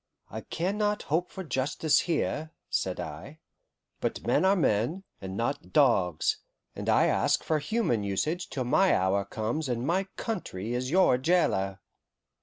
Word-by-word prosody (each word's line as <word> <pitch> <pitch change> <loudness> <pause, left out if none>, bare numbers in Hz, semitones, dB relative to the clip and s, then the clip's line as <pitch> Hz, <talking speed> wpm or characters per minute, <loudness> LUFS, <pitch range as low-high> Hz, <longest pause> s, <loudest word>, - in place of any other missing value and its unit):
"I - - -5
can 190 +5 -2
not 210 0 0
hope 175 +3 +1
for 190 - -7
justice 145 +1 +1
here," 155 -1 -1 0.2
said 90 -1 -1
I, 90 - -7 0.6
"but - - -3
men - - +3
are 195 +1 +5
men, 150 - +1 0.2
and 95 0 -6
not 120 +5 -2
dogs, 95 - +3 0.4
and - - -4
I - - +5
ask - - +2
for 155 -1 +1
human 150 - 0
usage 150 - -2
till 130 - -2
my 190 +10 +3
hour 95 +2 +1
comes 115 +9 -3
and 120 0 -1
my 185 +5 +1
country 120 - -4
is 125 +1 -2
your 170 -7 +4
jailer." 100 - +1
140 Hz, 155 wpm, -28 LUFS, -, 0.6 s, are